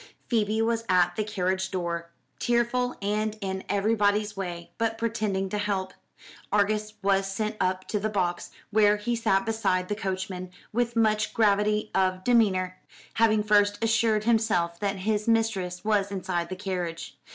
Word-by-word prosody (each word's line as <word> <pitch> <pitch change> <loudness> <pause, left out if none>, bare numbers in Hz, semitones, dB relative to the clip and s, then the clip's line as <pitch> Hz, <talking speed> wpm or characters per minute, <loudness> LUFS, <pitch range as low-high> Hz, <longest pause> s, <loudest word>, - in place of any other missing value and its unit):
Phoebe 220 -1 +1
was 230 0 0
at 175 -1 +3
the 215 - 0
carriage 190 -2 -1
door, 170 -2 -3 0.3
tearful, 240 +1 +1
and 215 +1 -1
in 190 -2 -4
everybody's 205 0 +1
way, 175 -3 -5
but 225 0 0
pretending 215 -4 -1
to 210 - -2
help. 195 -2 -2 0.6
Argus 210 +1 +1
was 195 0 +2
sent 215 +2 -2
up 185 0 -1
to 210 - 0
the 215 +2 -1
box, 180 -4 -1 0.2
where 210 -1 +4
he 235 +3 -1
sat 195 -3 +1
beside 185 -5 0
the 205 - 0
coachman 190 -2 -4 0.2
with 240 +1 0
much 215 -2 +2
gravity 210 0 +2
of 185 -1 +1
demeanour, 185 -6 +2 0.4
having 215 -2 +4
first 205 -1 +3
assured 225 -1 +2
himself 215 -7 +1
that 200 -1 -1
his 215 0 0
mistress 215 -6 0
was 205 -2 +1
inside 180 -3 -2
the 185 - -4
carriage. 180 -4 -4
205 Hz, 150 wpm, -27 LUFS, 185-220 Hz, 0.6 s, where